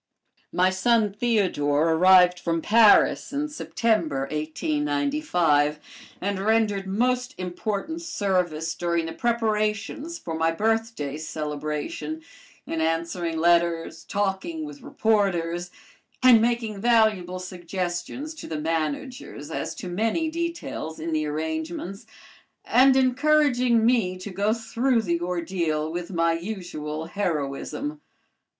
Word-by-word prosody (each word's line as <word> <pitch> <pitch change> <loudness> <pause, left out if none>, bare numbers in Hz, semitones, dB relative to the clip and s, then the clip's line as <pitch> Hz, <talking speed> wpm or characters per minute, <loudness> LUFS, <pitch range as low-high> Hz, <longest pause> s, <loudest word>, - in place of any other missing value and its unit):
My 185 +1 +3
son 215 +1 +2
Theodore 175 -9 +1
arrived 180 +1 +6
from 165 -1 -1
Paris 220 -1 +5
in 295 +1 -2
September, 220 - 0
1895, 175 - 0 0.4
and 200 0 -2
rendered 205 -2 +1
most 250 +6 0
important 205 - -3
service 180 - -1
during 170 -1 -1
the 165 - -5
preparations 225 +6 -1
for 170 - -6
my 160 0 +1
birthday 220 -6 -1
celebration, 155 - -4 0.4
in 165 - -3
answering 165 +1 -1
letters, 170 0 +2
talking 205 - -2
with 290 -2 -10
reporters, 180 -7 0 0.5
and 245 -3 +8
making 230 -3 -1
valuable 215 -6 +3
suggestions 180 - -4
to 315 - -9
the 155 -2 -4
managers 160 - -3
as - - -3
to 215 - -7
many 225 - 0
details 335 - -4
in 165 +1 -4
the 155 -1 0
arrangements, 160 +5 -4 0.6
and 260 +1 +5
encouraging 255 -3 +3
me 225 -7 +2
to 185 +2 -7
go 200 +3 +1
through 230 +2 0
the 170 -3 -1
ordeal 170 -3 -1
with 175 +1 -4
my 165 -2 +1
usual 165 -4 -5
heroism. 180 - -3
190 Hz, 110 wpm, -25 LUFS, 165-235 Hz, 0.6 s, and